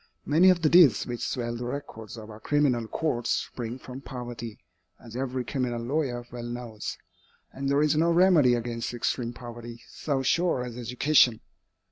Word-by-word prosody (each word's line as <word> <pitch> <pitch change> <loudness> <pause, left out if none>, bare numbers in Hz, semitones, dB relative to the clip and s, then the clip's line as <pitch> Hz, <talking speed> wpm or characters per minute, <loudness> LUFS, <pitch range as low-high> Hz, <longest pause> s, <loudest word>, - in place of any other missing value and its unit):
Many 170 +6 +5
of 175 -2 +3
the - - +5
deeds 160 - +6
which 120 -1 -5
swell 120 -2 -3
the 120 +1 -5
records 120 -4 -6
of 110 0 -9
our 105 - -11
criminal 125 -3 +1
courts 125 -3 -2
spring 120 0 -2
from 130 +1 -9
poverty, 120 -4 -7 0.4
as 115 -1 -12
every 130 -1 -2
criminal 125 -3 -2
lawyer 120 -1 -2
well 120 0 -6
knows, 120 -3 -6 0.6
and 135 +1 -3
there 140 +2 +3
is 150 0 +2
no 165 +2 +3
remedy 170 -8 +5
against 120 0 -3
extreme 120 0 -1
poverty 120 -1 -9
so 140 -3 -2
sure 170 -4 +1
as 120 -2 -7
education. 125 0 +3
125 Hz, 165 wpm, -27 LUFS, 120-145 Hz, 0.6 s, deeds